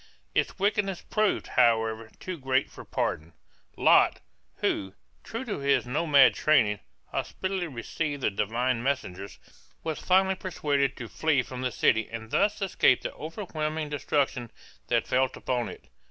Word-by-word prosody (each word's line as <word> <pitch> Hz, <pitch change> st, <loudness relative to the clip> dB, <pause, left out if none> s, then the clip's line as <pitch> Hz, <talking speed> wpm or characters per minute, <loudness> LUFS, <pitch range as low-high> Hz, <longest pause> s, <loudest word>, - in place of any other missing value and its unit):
Its -, -, 0 dB
wickedness 200 Hz, -2 st, 0 dB
proved, 215 Hz, -1 st, +1 dB
however, 115 Hz, -2 st, +2 dB
too 185 Hz, -, -5 dB
great 135 Hz, -2 st, 0 dB
for -, -, -10 dB
pardon. 80 Hz, +2 st, -2 dB, 0.4 s
Lot, -, -, +5 dB, 0.4 s
who, 95 Hz, -1 st, -1 dB, 0.3 s
true 230 Hz, +4 st, -5 dB
to 215 Hz, -, -3 dB
his 140 Hz, -1 st, +2 dB
nomad 145 Hz, +1 st, +5 dB
training, 110 Hz, -10 st, +3 dB, 0.3 s
hospitably 190 Hz, -2 st, -2 dB
received 145 Hz, +2 st, -4 dB
the -, -, +2 dB
divine 115 Hz, +5 st, 0 dB
messengers, 100 Hz, -8 st, -3 dB, 0.5 s
was 160 Hz, -2 st, -3 dB
finally 190 Hz, +1 st, +3 dB
persuaded 145 Hz, -8 st, -1 dB
to 120 Hz, -, -6 dB
flee 145 Hz, 0 st, +1 dB
from 125 Hz, 0 st, -7 dB
the 130 Hz, -1 st, -1 dB
city 110 Hz, -1 st, +2 dB
and 110 Hz, -1 st, -7 dB
thus 210 Hz, 0 st, +2 dB
escaped 190 Hz, -, +3 dB
the -, -, -4 dB
overwhelming 155 Hz, -3 st, -4 dB
destruction 140 Hz, -4 st, -1 dB, 0.4 s
that -, -, +1 dB
felt 130 Hz, 0 st, +1 dB
upon 125 Hz, -2 st, -1 dB
it. -, -, -11 dB
140 Hz, 140 wpm, -28 LUFS, 120-170 Hz, 0.5 s, Lot